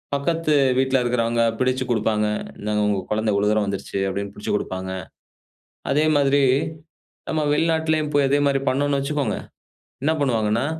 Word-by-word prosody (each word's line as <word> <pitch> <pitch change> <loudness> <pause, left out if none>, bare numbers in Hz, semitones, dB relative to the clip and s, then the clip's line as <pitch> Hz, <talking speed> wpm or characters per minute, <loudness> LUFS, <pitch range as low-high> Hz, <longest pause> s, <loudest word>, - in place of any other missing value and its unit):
பக்கத்து 160 +2 0 0.2
வீட்ல 130 0 +2
இருக்குறவங்க 115 -1 +1 0.2
பிடிச்சுக் 130 0 0
கொடுப்பாங்க. 110 -2 +1 0.3
"இந்தாங்க 105 0 -1
உங்க 100 -2 +1
குழந்த 110 -1 +1
இவ்வளோ 100 +1 +2
தூரம் 105 -1 +2
வந்துருச்சு," 100 0 -4
அப்டினு 100 +1 -4
பிடிச்சுக் 105 - -2
குடுப்பாங்க. 95 -1 -5 1.0
அதே 150 +3 +3
மாதிரி, 140 0 +3 0.9
நம்ம 155 -1 0
வெளிநாட்டிலையும் 160 -1 +1
போய் 140 -1 +4
அதே 140 +1 +3
மாரி 135 -1 +1
பண்ணோம்னு 140 +1 +1
வச்சுக்கோங்க, 140 -5 -1 0.7
என்ன 155 +2 +2
பண்ணுவாங்கன்னா, 115 -2 +1
130 Hz, 140 wpm, -22 LUFS, 105-145 Hz, 1.0 s, போய்